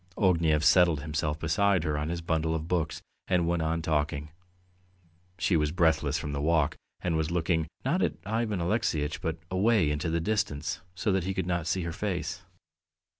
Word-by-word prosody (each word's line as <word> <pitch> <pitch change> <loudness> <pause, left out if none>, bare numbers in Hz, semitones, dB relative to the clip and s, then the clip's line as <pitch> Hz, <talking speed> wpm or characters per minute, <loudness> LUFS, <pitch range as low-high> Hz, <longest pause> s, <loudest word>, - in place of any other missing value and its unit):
Ognev 85 -6 +3
settled 85 -4 +5
himself 75 0 -2
beside 90 +3 +2
her 75 -3 0
on 75 +1 -2
his 85 0 -3
bundle 80 -1 0
of 80 0 -4
books 80 -1 -1 0.2
and 90 -3 +2
went 85 -1 +1
on 80 +1 -1
talking. 75 -1 -1 1.1
She 90 - +1
was 75 -2 +2
breathless 80 -4 +2
from 75 -3 -4
the 70 0 -2
walk, 80 -1 +2 0.3
and 85 -2 0
was 80 0 0
looking, 85 -1 0 0.2
not - - +1
at - - +1
Ivan 110 -2 -1
Alexeyitch, 85 -6 0
but 80 0 -2
away 95 -4 +3
into 75 +2 -1
the 85 +1 +1
distance 100 -6 -1
so 95 +4 0
that 95 -2 +1
he 95 0 -2
could 95 - -1
not 85 -2 -1
see 95 +1 0
her 85 0 -4
face. 90 -3 -3
80 Hz, 180 wpm, -28 LUFS, 75-90 Hz, 1.1 s, settled